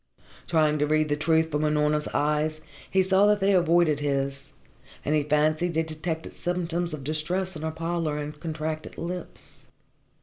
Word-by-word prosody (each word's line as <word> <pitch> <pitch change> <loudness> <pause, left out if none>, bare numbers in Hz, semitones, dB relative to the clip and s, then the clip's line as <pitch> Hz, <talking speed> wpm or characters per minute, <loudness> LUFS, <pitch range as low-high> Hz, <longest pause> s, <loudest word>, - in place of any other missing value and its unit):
Trying 155 -2 +2
to 150 - +2
read 155 0 +2
the 145 - +2
truth 160 +2 +2
from 150 0 0
Unorna's 150 0 +1
eyes, 150 +1 0 0.3
he 190 0 +3
saw 190 +2 +4
that 210 0 +3
they 195 0 +3
avoided 170 -4 +3
his, 140 -1 -2 0.5
and 150 - +1
he 155 - +3
fancied 155 +3 +1
he 160 - +2
detected 160 +1 -5
symptoms 175 -1 -2
of 140 - -10
distress 170 +6 -2
in 155 - -6
her 160 - -1
pallor 165 -1 -2
and 150 0 -6
contracted 155 -1 -4
lips. 175 +1 -7
155 Hz, 165 wpm, -26 LUFS, 150-170 Hz, 0.5 s, saw